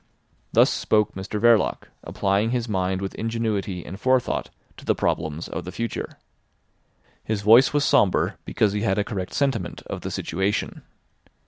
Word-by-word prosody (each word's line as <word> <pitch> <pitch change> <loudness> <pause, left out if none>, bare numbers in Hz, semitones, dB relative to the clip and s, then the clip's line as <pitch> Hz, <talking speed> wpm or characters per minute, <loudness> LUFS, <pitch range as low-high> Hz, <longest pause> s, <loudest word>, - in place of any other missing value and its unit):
Thus - - +5
spoke 105 -2 +1
Mr 95 +2 -5
Verloc, 115 0 +3
applying 100 +4 0
his 120 -1 -1
mind 95 -2 -1
with 95 - -4
ingenuity 110 -6 -2
and 95 +3 -8
forethought 130 +2 +1 0.3
to - - -12
the - - +1
problems 80 0 -2
of 85 - -5
the 90 - -7
future. 115 +3 -4 1.1
His 105 -2 -2
voice 115 +6 +7
was 145 -1 +1
sombre, 125 -11 +2
because 100 -2 +1
he 105 - -1
had 95 -2 +1
a 105 - +2
correct 95 -3 -5
sentiment 125 -11 -1
of - - -6
the - - -4
situation. 95 +2 -2
105 Hz, 155 wpm, -24 LUFS, 95-115 Hz, 1.1 s, voice